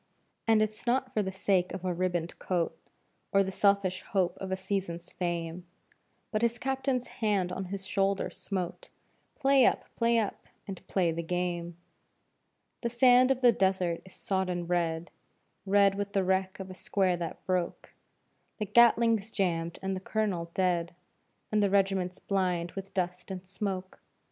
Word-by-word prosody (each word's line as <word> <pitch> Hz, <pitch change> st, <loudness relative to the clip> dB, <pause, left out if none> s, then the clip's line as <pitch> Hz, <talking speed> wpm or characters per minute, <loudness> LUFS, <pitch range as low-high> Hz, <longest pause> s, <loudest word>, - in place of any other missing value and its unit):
And 220 Hz, -1 st, +5 dB
it's 215 Hz, +2 st, -5 dB
not 255 Hz, +1 st, +1 dB
for 215 Hz, -, +2 dB
the 190 Hz, -1 st, -2 dB
sake 190 Hz, -1 st, +1 dB
of 190 Hz, -1 st, -6 dB
a 180 Hz, -, +1 dB
ribboned 175 Hz, -1 st, -2 dB
coat 175 Hz, -3 st, -1 dB, 0.6 s
Or 195 Hz, -1 st, +5 dB
the 190 Hz, -, -3 dB
selfish 200 Hz, -2 st, +2 dB
hope 190 Hz, -5 st, 0 dB
of 190 Hz, -1 st, -5 dB
a 190 Hz, -, 0 dB
season's 185 Hz, -3 st, -3 dB
fame, 175 Hz, -1 st, -3 dB, 0.7 s
But 215 Hz, -, 0 dB
his 235 Hz, 0 st, +1 dB
Captain's 265 Hz, 0 st, -1 dB
hand 200 Hz, -5 st, 0 dB
on 190 Hz, +1 st, -3 dB
his 190 Hz, +1 st, -5 dB
shoulder 195 Hz, 0 st, 0 dB
smote; 185 Hz, -3 st, -4 dB, 0.5 s
"Play 270 Hz, -1 st, +4 dB
up! -, -, +3 dB
Play 235 Hz, 0 st, +3 dB
up! 215 Hz, -3 st, -2 dB, 0.2 s
And 195 Hz, -2 st, -6 dB
play 180 Hz, -4 st, +2 dB
the 165 Hz, +1 st, -3 dB
game!" 175 Hz, 0 st, -2 dB, 1.0 s
The 235 Hz, -, -1 dB
sand 250 Hz, +1 st, +6 dB
of 265 Hz, -1 st, +1 dB
the 245 Hz, -1 st, +7 dB
desert 190 Hz, -5 st, +1 dB
is 190 Hz, -, -15 dB
sodden 185 Hz, -4 st, -1 dB
red 170 Hz, -1 st, -1 dB, 0.6 s
Red 200 Hz, 0 st, +5 dB
with 200 Hz, 0 st, -4 dB
the 195 Hz, -, +2 dB
wreck 190 Hz, +1 st, 0 dB
of 190 Hz, -1 st, -6 dB
a -, -, -7 dB
square 185 Hz, 0 st, +1 dB
that 170 Hz, -2 st, -6 dB
broke; 180 Hz, -2 st, -2 dB, 0.6 s
The 215 Hz, -, -2 dB
Gatling's 230 Hz, 0 st, +4 dB
jammed 170 Hz, -5 st, -1 dB
and 190 Hz, 0 st, -1 dB
the -, -, -3 dB
colonel 190 Hz, -4 st, -1 dB
dead, 175 Hz, -2 st, +1 dB, 0.6 s
And 215 Hz, 0 st, +3 dB
the 200 Hz, -, +3 dB
regiment's 190 Hz, -2 st, +1 dB
blind 180 Hz, -3 st, -1 dB
with 195 Hz, 0 st, -8 dB
dust 180 Hz, -1 st, -2 dB
and 190 Hz, -1 st, -6 dB
smoke. 190 Hz, -1 st, -4 dB
190 Hz, 165 wpm, -30 LUFS, 180-205 Hz, 1.0 s, the